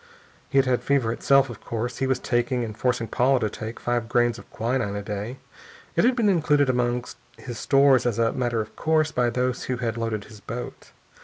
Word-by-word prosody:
He 140 - +3
had 130 -2 +2
fever 130 -5 +1
itself, 135 +2 +3
of 120 -5 -10
course. 120 +2 -4
He 135 - +1
was 130 -1 +2
taking, 120 0 0
and 110 -2 -5
forcing 125 -1 0
Paula 130 +3 +2
to 110 - 0
take, 110 +2 -7
five 120 -2 -1
grains 120 -1 +2
of - - -15
quinine 115 -3 -1
a 100 - -4
day. 105 +5 -5 0.6
It - - +3
had 250 +1 +4
been 230 -4 +2
included 150 -7 +3
among 125 0 0 0.3
his 115 0 -7
stores 135 -3 +4
as 115 - -1
a 115 -1 +2
matter 120 -3 0
of 110 0 -9
course 155 -1 +1
by 125 -2 +1
those 125 +1 -1
who 125 - -2
had 115 -2 -2
loaded 115 -3 -2
his 105 0 -13
boat. 120 +4 -7
120 Hz, 210 wpm, -25 LUFS, 115-130 Hz, 0.6 s, had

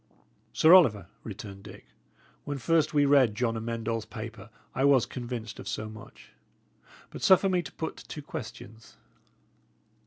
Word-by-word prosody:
"Sir 160 +2 +5
Oliver," 120 - +6 0.2
returned 100 -2 -8
Dick, 100 -1 -13 0.6
"when 145 -1 -4
first 155 +5 +1
we 145 -1 +3
read 135 -6 +4
John 115 0 0
Amend 115 0 -4
All's 115 -1 -1
paper, 110 -2 -8 0.2
I 130 - -1
was 135 -4 +5
convinced 120 -4 -6
of - - -9
so 110 0 -4
much. 110 0 -14 0.8
But - - -9
suffer 190 +1 +5
me 180 -1 +1
to 145 - -10
put 160 - -5
two 150 - -9
questions. 115 -4 -9
120 Hz, 150 wpm, -28 LUFS, 110-145 Hz, 0.8 s, Oliver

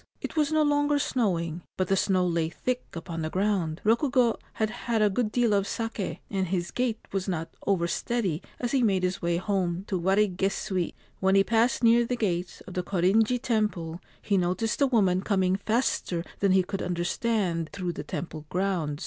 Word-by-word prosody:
It - - -6
was 305 -1 +2
no 310 0 +3
longer 290 0 +2
snowing; 175 - 0 0.2
but 185 - 0
the 195 - +3
snow 185 -1 +2
lay 165 -2 0
thick 250 +9 -3
upon 165 -1 -5
the 155 - -2
ground. 185 -4 0
Rokugo 240 +1 +3
had 220 -1 -1
had 230 0 -1
a 210 -1 +4
good 215 +1 0
deal 235 -3 +2
of 200 -1 +2
sake, 225 -3 -3
and 190 -2 0
his 175 0 -2
gait 245 -3 0
was 195 0 -2
not 165 -3 -3
over 190 -4 +2
steady 195 -5 -1 0.2
as 245 -1 -2
he 270 - +2
made 195 -5 +2
his 180 0 -1
way 170 0 +1
home 185 -2 -1
to 190 -3 -2
Warigesui. 190 -1 0 0.2
When 190 0 +3
he 195 - +6
passed 230 +4 +2
near 235 +1 +6
the 245 +1 -1
gates 180 -6 -2
of 185 - -10
the 180 - -1
Korinji 200 +7 +2
Temple 205 -8 -1 0.2
he 200 -2 +2
noticed 185 +8 -1
a 280 - +6
woman 195 -7 +3
coming 190 -2 +1
faster 200 -5 0 0.2
than 195 -2 +3
he 190 -1 +4
could 195 +2 -4
under 175 -1 -2
stand 180 -6 0
through 180 -2 -3
the - - -6
temple 155 -3 -6
grounds. 180 -6 -1
195 Hz, 190 wpm, -27 LUFS, 175-225 Hz, 0.2 s, he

